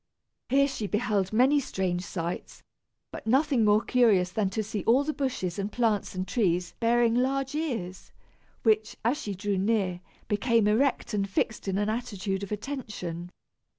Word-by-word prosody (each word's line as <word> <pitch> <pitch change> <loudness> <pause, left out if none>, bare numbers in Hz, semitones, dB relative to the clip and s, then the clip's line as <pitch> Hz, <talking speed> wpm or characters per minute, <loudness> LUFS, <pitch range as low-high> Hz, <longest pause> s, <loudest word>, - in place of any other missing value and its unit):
Here 275 +2 +4
she 225 -6 -4
beheld 205 -3 0
many 260 +6 +4
strange 185 -8 -2
sights, 175 -1 -5 0.5
but - - -8
nothing 265 0 +3
more 210 +1 +4
curious 210 -8 +3
than 200 -1 0
to 215 +3 -2
see 210 -1 -4
all 250 +5 +4
the 305 +1 -2
bushes 230 - -2
and 200 +2 -2
plants 220 -6 0
and 185 +1 -3
trees 180 -5 0
bearing 235 0 +3
large 270 +2 0
ears, 230 - -4 0.5
which, 215 0 +2
as 250 +6 +1
she 205 -2 -4
drew 200 0 -1
near, 195 -3 0 0.3
became 220 +1 +2
erect 245 +3 +1
and 200 -1 0
fixed 205 +1 -1
in 195 0 0
an 205 +1 0
attitude 205 -4 -3
of 200 - -6
attention. 205 -8 -5
215 Hz, 160 wpm, -28 LUFS, 190-245 Hz, 0.5 s, Here